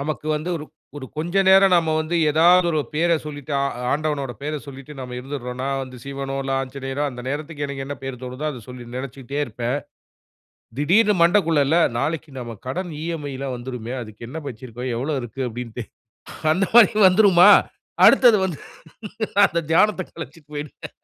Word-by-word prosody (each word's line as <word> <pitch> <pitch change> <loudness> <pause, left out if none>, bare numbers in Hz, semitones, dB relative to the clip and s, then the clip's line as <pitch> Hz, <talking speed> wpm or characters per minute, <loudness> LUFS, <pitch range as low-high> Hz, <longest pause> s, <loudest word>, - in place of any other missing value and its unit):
நமக்கு 150 +1 -4
வந்து 155 +4 -4
ஒரு 150 - -7 0.3
ஒரு 130 - -8
கொஞ்சம் 185 +4 +1
நேரம் 195 0 +6
நம்ம 165 -2 +2
வந்து 160 +2 -2
ஏதாவது 175 +3 +5
ஒரு 155 -2 +1
பெயரை 170 +2 +2
சொல்லிட்டு 145 -1 -7
அ - - +1 0.3
ஆண்டவனோட 145 -3 -2
பெயர 150 +1 -3
சொல்லிட்டு 140 +1 -10
நம்ம 125 -1 -6
இருந்துடுறோன்னா 130 -1 -5
வந்து 130 -1 -8
சிவனோ 135 0 -5
இல்ல, 135 - -3
ஆஞ்சநேயனோ 135 +1 -5
அந்த 125 -1 -9
நேரத்துக்கு 145 +1 -4
எனக்கு 140 -1 -5
என்ன 145 - -4
பெயர் 135 -2 -6
தோணுதோ, 130 +3 -6
அத 130 -5 -8
சொல்லி 125 -1 -9
நினச்சுக்கிட்டே 135 +1 -5
இருப்பேன். 120 +2 -3 1.0
திடீருன்னு 205 +9 +4
மண்டக்குள்ள 170 -4 +4
இல்ல 160 +5 +3 0.2
நாளைக்கு 150 +2 -3
நம்ம 120 -3 -7
கடன் 175 +7 -3
இஎம்ஐல்லாம் 145 -5 -4
வந்துருமே, 120 -1 -6
அதுக்கு 110 +1 -10
என்ன 155 +6 -6
வச்சிருக்கோம், 125 +1 -7
எவ்வளவு 135 +3 -2
இருக்கு 120 +3 -6
அப்படின்ட்டு 120 0 -6 0.7
அந்த 190 +3 0
மாதிரி 235 -4 +8
வந்துருமா? 185 -1 +6 0.6
அடுத்தது 235 -4 +7
வந்து 170 -6 -4 0.8
நான் 200 - +6
அந்த 170 0 -1
தியானத்த 205 +4 +3
கலச்சுட்டு 150 -1 -10
போயிடுவேன். 145 -1 -7
145 Hz, 160 wpm, -22 LUFS, 130-165 Hz, 1.0 s, மாதிரி